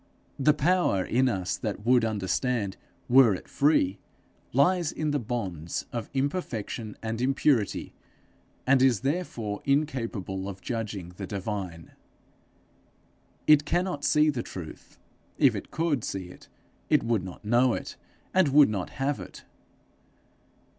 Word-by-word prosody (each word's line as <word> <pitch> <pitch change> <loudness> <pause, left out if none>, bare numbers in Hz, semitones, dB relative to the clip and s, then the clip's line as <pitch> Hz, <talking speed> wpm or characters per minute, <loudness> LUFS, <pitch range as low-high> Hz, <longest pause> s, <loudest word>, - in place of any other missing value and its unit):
The 150 +2 +4
power 155 - +2
in 130 +2 +2
us 95 -5 -1
that 105 0 -4
would 125 -1 +4
understand 105 0 -1 0.3
were 120 -5 +6
it - - -10
free, 105 -10 +2 0.5
lies 170 +5 +3
in 155 -1 -2
the 145 - +1
bonds 95 - -4
of 115 -3 -4
imperfection 130 - -3
and 115 +1 -3
impurity, 130 -4 +1 0.7
and 135 0 +4
is 130 -5 +4
therefore 135 - -2
incapable 115 - -1
of 95 -1 -8
judging 105 -7 -4
the 95 - -5
divine. 95 -4 -5 1.5
It 150 -1 +6
cannot 175 -2 -1
see 150 0 +4
the 130 -4 -3
truth. 85 -8 -9 0.4
If - - +5
it - - -6
could 160 -7 0
see 95 -2 -4
it, - - -14 0.4
it - - +4
would 115 -5 0
not 95 +3 -9
know 120 +3 +3
it, - - -6 0.4
and 185 -3 +4
would 140 -1 +6
not 95 -4 -3
have 135 +1 0
it. - - -10
120 Hz, 135 wpm, -27 LUFS, 100-140 Hz, 1.5 s, were